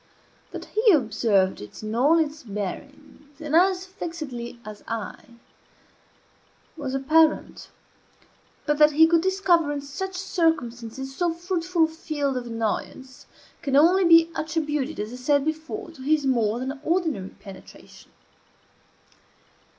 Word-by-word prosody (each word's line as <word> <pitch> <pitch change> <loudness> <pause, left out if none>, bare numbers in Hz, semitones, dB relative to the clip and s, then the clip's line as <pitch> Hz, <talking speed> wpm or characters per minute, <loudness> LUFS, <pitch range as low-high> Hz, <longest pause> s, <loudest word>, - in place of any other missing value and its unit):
That - - -8
he 435 0 +3
observed 200 - +1
it 105 - -11
in 215 0 -4
all 280 +8 +4
its 310 -1 -1
bearings, 280 +7 -8
and 310 -1 -2
as 370 +1 +3
fixedly 305 -11 -7
as 210 -1 -10
I, 230 +1 -6 1.4
was 275 -4 -4
apparent; 310 +4 +2 1.0
but 295 -1 0
that 300 0 +6
he 320 +2 +7
could 330 0 +3
discover 360 -4 +2
in 290 - -2
such 370 +7 -6
circumstances 265 - -2
so 350 +1 0
fruitful 345 0 -1
a - - +4
field 305 -4 -3
of 245 -1 -4
annoyance 230 +3 -4 0.3
can 275 -1 -1
only 350 +7 +5
be 330 -1 +6
attributed, 310 -2 -2
as 210 +3 -4
I - - -7
said 285 +2 +1
before, 315 +1 -4
to 310 -5 -14
his 295 +1 +1
more 235 -4 +1
than 265 +2 -5
ordinary 315 - -1
penetration. 195 -2 -14
295 Hz, 130 wpm, -24 LUFS, 250-330 Hz, 1.4 s, he